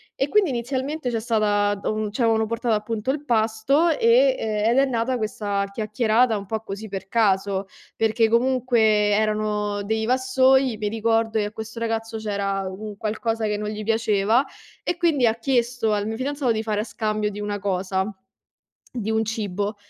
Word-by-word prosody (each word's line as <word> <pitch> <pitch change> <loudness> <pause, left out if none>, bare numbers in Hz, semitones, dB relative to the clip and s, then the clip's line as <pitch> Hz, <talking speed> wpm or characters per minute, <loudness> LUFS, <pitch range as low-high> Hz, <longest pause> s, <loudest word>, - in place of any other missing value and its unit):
E, 270 - 0
quindi 400 +1 +3
inizialmente 260 +3 -2
c'è 230 - -1
stata 205 -3 +1
uhm, 215 -1 -2
ci 230 - -4
avevano 225 -1 +3
portato 230 0 0
appunto 215 +3 -3
il 290 +2 -1
pasto, 230 +6 +2
e - - +4
uhm, 215 0 0
ed 245 - +2
è 275 - +5
nata 250 0 -1
questa 205 -2 -2
chiacchierata 220 +2 +1
un 200 - -7
po' 220 +2 -3
così 215 0 -7
per 195 -1 -6
caso, 195 -2 +1 0.3
perché 225 +1 +2
comunque 245 0 +2
erano 210 -1 +1
dei 220 +2 -1
vassoi, 260 0 +3
mi 210 -1 -2
ricordo 225 0 +1
che 210 - 0
a 210 - -5
questo 220 +1 -7
ragazzo, 225 0 -2
c'era 200 -2 -2
un 205 +2 -7
qualcosa 225 +1 -2
che 210 - 0
non 210 0 -3
gli 215 0 -5
piaceva, 225 +2 +2 0.4
e 350 - -1
quindi 320 -7 +2
ha 225 -1 +3
chiesto 235 -2 0
al 205 -1 0
mio 220 +1 -3
fidanzato 275 -1 -1
di 220 0 -1
fare 210 -1 -1
a - - -2
scambio 215 -2 -2
di 205 - -8
una 205 0 -3
cosa, 190 -1 -1 0.9
di 220 -3 -4
un 220 0 +1
cibo. 205 -1 -3
220 Hz, 180 wpm, -23 LUFS, 210-240 Hz, 0.9 s, è